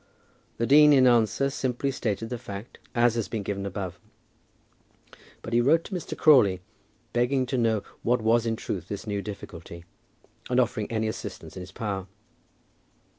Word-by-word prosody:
The 115 Hz, -, 0 dB
dean 150 Hz, +3 st, +7 dB
in 130 Hz, -2 st, +6 dB
answer 120 Hz, +3 st, +3 dB
simply 135 Hz, 0 st, -1 dB
stated 115 Hz, -3 st, -3 dB
the 125 Hz, -1 st, -4 dB
fact 105 Hz, -1 st, -9 dB, 0.2 s
as 120 Hz, -1 st, +3 dB
it -, -, 0 dB
has 110 Hz, -, -2 dB
been 110 Hz, -3 st, -4 dB
given 100 Hz, 0 st, -3 dB
above; 95 Hz, -2 st, -5 dB, 1.4 s
but 115 Hz, -, -6 dB
he 120 Hz, -, +4 dB
wrote 160 Hz, +7 st, +4 dB
to -, -, -9 dB
Mr. 180 Hz, -, -5 dB
Crawley 110 Hz, -, +5 dB, 0.5 s
begging 130 Hz, +2 st, +2 dB
to 130 Hz, -, -2 dB
know 110 Hz, -3 st, +1 dB, 0.2 s
what 125 Hz, +2 st, +2 dB
was 115 Hz, +1 st, +2 dB
in 115 Hz, -, 0 dB
truth 95 Hz, -5 st, -5 dB
this 100 Hz, +1 st, -6 dB
new 100 Hz, -2 st, -2 dB
difficulty, 85 Hz, -4 st, -9 dB, 0.6 s
and 125 Hz, 0 st, +2 dB
offering 115 Hz, -3 st, 0 dB
any 110 Hz, -1 st, 0 dB
assistance 110 Hz, -, -6 dB
in 95 Hz, -, -6 dB
his 90 Hz, +1 st, -9 dB
power. 100 Hz, -3 st, -4 dB
115 Hz, 170 wpm, -26 LUFS, 100-125 Hz, 1.4 s, dean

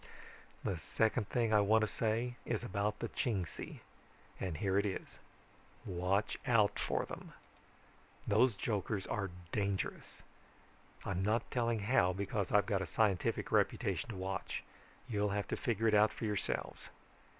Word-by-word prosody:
"The 90 Hz, -, -1 dB
second 110 Hz, +6 st, +1 dB
thing 115 Hz, -3 st, +1 dB
I 105 Hz, -, +6 dB
want 110 Hz, +2 st, +4 dB
to 110 Hz, -, +2 dB
say 115 Hz, +4 st, 0 dB
is 115 Hz, -1 st, -2 dB
about 105 Hz, -1 st, -1 dB
the -, -, -3 dB
Chingsi, 95 Hz, -9 st, -3 dB, 0.6 s
and 90 Hz, -5 st, -2 dB
here 95 Hz, +2 st, +2 dB
it 100 Hz, -, +1 dB
is: 95 Hz, -, -5 dB, 0.7 s
watch 95 Hz, +3 st, 0 dB
out 105 Hz, -4 st, +4 dB
for -, -, 0 dB
them. -, -, -8 dB, 0.9 s
Those 110 Hz, +2 st, +4 dB
jokers 100 Hz, 0 st, -1 dB
are 100 Hz, -2 st, -2 dB, 0.2 s
dangerous. 100 Hz, -2 st, -2 dB, 0.8 s
I'm 95 Hz, -2 st, -1 dB
not 110 Hz, +4 st, +1 dB
telling 115 Hz, -3 st, +1 dB
how 100 Hz, -4 st, +3 dB
because 100 Hz, 0 st, -2 dB
I've 105 Hz, 0 st, +5 dB
got 100 Hz, -4 st, +1 dB
a 95 Hz, -, -3 dB
scientific 95 Hz, +2 st, +1 dB
reputation -, -, +1 dB
to 110 Hz, -, -4 dB
watch. 95 Hz, +1 st, -3 dB, 0.4 s
You'll 105 Hz, -3 st, +1 dB
have 100 Hz, 0 st, -1 dB
to -, -, 0 dB
figure 115 Hz, -4 st, 0 dB
it 110 Hz, -, +3 dB
out 105 Hz, +1 st, +6 dB
for -, -, -5 dB
yourselves. 105 Hz, -2 st, -2 dB
105 Hz, 150 wpm, -35 LUFS, 95-110 Hz, 0.9 s, I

